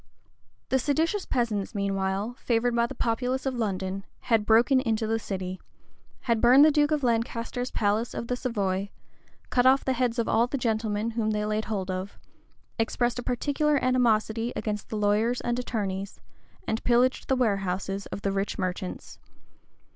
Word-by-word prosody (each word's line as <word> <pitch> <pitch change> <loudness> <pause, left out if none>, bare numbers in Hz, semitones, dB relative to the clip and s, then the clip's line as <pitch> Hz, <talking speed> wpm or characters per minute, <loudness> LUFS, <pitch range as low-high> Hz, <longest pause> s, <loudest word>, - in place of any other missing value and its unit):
The 265 - +2
seditious 320 - 0
peasants, 225 -4 -1
meanwhile, 200 +3 -1
favored 235 0 +1
by 235 0 +2
the - - -8
populace 250 +3 -1
of 265 - 0
London, 195 -4 -2 0.2
had 225 -3 +1
broken 235 +4 +5
into 225 -3 0
the 225 +1 0
city; 185 -3 -5 0.6
had 230 -3 0
burned 255 +4 +7
the 310 - +6
duke 295 0 +3
of 305 -2 0
Lancaster's 235 +1 -1
palace 215 +2 0
of - - -3
the 250 - -1
Savoy; 200 -6 -2 0.6
cut 250 0 +4
off 265 +1 +4
the 265 - +2
heads 245 -1 0
of 235 - 0
all 235 +2 +3
the 275 - -2
gentlemen 220 -2 -1
whom 225 -1 -1
they 210 -1 0
laid 215 +1 -1
hold 195 -4 -3
of; 185 +2 -5 0.6
expressed 240 +2 0
a - - -2
particular 285 +5 0
animosity 235 -3 +1
against 210 -1 -3
the 215 - -3
lawyers 210 +4 +2
and 240 0 -1
attorneys; 200 -5 -3 0.5
and 220 - -2
pillaged 250 +1 +2
the 265 - +2
warehouses 195 -4 -1
of 200 - -7
the 195 - +1
rich 195 +1 -2
merchants. 185 0 -4
225 Hz, 165 wpm, -27 LUFS, 205-250 Hz, 0.6 s, burned